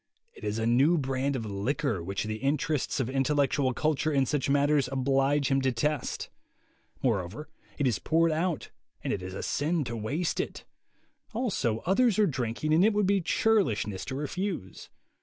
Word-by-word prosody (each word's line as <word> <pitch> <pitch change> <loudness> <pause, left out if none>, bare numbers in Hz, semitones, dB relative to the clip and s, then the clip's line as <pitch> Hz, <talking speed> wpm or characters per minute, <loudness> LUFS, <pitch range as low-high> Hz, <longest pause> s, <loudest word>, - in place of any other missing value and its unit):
It - - -15
is 105 +1 -2
a 110 - -1
new 135 +9 +4
brand 135 0 -1
of 115 -4 -3
liquor 105 - -1
which 95 +3 -3
the 110 0 -3
interests 145 +3 0
of 130 - 0
intellectual 135 0 +1
culture 155 +4 0
in 135 -2 +3
such 140 +1 -1
matters 145 -1 +3
oblige 135 +1 +2
him 135 0 +3
to 130 0 +2
test; 145 +4 -1 0.8
moreover 110 - -1 0.3
it 145 - 0
is 120 -6 +1
poured 165 +1 +2
out 165 +1 -1 0.3
and - - -1
it 100 - -3
is 95 +1 -5
sin 155 +2 0
to 120 -2 -5
waste 140 +11 -2
it; - - -4 0.7
also 155 - -1
others 205 +3 +3
are 215 - +5
drinking 130 - -1
and 165 +4 +5
it 220 +1 +4
would 205 -1 +2
be 195 0 +2
churlishness 160 - +1
to 130 - -4
refuse. 150 - -4
140 Hz, 170 wpm, -28 LUFS, 115-155 Hz, 0.8 s, are